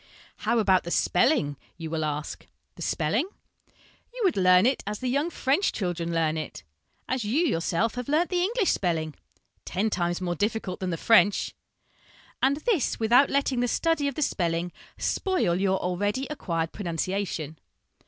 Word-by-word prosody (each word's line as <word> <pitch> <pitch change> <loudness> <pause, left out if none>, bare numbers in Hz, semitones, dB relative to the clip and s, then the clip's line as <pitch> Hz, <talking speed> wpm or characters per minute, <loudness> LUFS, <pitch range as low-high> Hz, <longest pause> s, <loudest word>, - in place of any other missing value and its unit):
' - - -27
How 235 +2 +3
about 190 -4 +3
the 170 - -6
spelling? 175 - +2
' - - -36
you 165 -2 -6
will 160 -1 -1
ask. 150 0 -4 0.3
The - - -13
spelling? 210 - 0 0.8
You - - -8
would 370 -5 +3
learn 185 0 +5
it 260 +1 +2
as 210 0 -2
the 255 - -4
young 285 +6 +1
French 300 +4 +1
children 175 -4 -3
learn 160 -1 +1
it, 155 - -6 0.4
as 260 -2 -1
you 265 +12 +1
yourself 185 - 0
have 250 +1 -5
learnt 325 +5 +2
the 360 -1 +1
English 420 +2 +1
spelling, 160 -4 -1 0.5
ten 205 +4 -1
times 175 -2 0
more 180 -2 -2
difficult 205 0 -2
than 185 - -2
the 165 - -2
French; 205 -2 +4 0.9
and 275 +2 +3
this 400 - +1
without 240 +5 +5
letting 275 -2 +1
the 245 - +1
study 325 +3 +1
of 280 - -3
the 305 - 0
spelling 175 -7 -1 0.3
spoil 355 - 0
your 190 -1 +2
already 205 +9 -1
acquired 165 - -2
pronunciation. 170 -4 -3
205 Hz, 170 wpm, -26 LUFS, 170-270 Hz, 0.9 s, learn